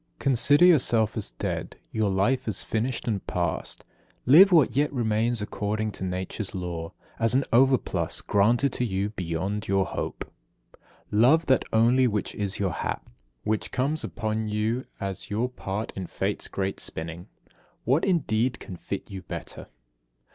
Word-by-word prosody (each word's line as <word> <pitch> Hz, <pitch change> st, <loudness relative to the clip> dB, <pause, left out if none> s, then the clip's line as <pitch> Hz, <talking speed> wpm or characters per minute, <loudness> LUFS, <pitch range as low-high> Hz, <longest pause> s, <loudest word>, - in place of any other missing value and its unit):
56. -, -, -41 dB
Consider 140 Hz, +5 st, +5 dB
yourself 120 Hz, -, +4 dB
as -, -, -3 dB
dead, -, -, -4 dB, 0.2 s
your 110 Hz, -2 st, +1 dB
life 110 Hz, +8 st, +1 dB
as 110 Hz, -, -1 dB
finished 115 Hz, +3 st, -2 dB
and 105 Hz, -5 st, -1 dB
past. 85 Hz, -3 st, -3 dB, 0.4 s
Live 180 Hz, +10 st, +8 dB
what 160 Hz, -9 st, +4 dB
yet 145 Hz, +2 st, +2 dB
remains 115 Hz, -2 st, 0 dB
according 105 Hz, +1 st, -2 dB
to 95 Hz, -, -8 dB
Nature's 95 Hz, +3 st, -4 dB
laws, 85 Hz, -3 st, -4 dB, 0.3 s
as 115 Hz, +2 st, +2 dB
an 135 Hz, -, +3 dB
overplus 130 Hz, +1 st, +2 dB
granted 115 Hz, +6 st, +3 dB
to -, -, -1 dB
you 100 Hz, -2 st, -1 dB
beyond 95 Hz, +2 st, -3 dB
your 95 Hz, -1 st, +2 dB
hope. -, -, -4 dB, 0.9 s
57. 105 Hz, -, +3 dB
Love 160 Hz, +7 st, +5 dB
that 130 Hz, -, +3 dB
only 120 Hz, +3 st, +4 dB
which 105 Hz, -3 st, -2 dB
is 100 Hz, -1 st, -2 dB
your 95 Hz, -4 st, -1 dB
hap, -, -, -4 dB, 0.3 s
which 110 Hz, 0 st, -1 dB
comes 145 Hz, +5 st, -1 dB
upon 110 Hz, 0 st, -2 dB
you 110 Hz, +4 st, -1 dB
as 95 Hz, -1 st, -5 dB
your 110 Hz, +4 st, 0 dB
part 105 Hz, -4 st, -5 dB
in 95 Hz, -2 st, -5 dB
Fate's -, -, -3 dB
great 95 Hz, 0 st, -3 dB
spinning. 85 Hz, +2 st, -6 dB, 0.6 s
What, 135 Hz, +7 st, +2 dB
indeed, 130 Hz, -, +1 dB
can 95 Hz, -6 st, -8 dB
fit -, -, -6 dB
you 95 Hz, -1 st, -6 dB
better? 90 Hz, -, -8 dB
110 Hz, 155 wpm, -26 LUFS, 95-125 Hz, 0.9 s, Live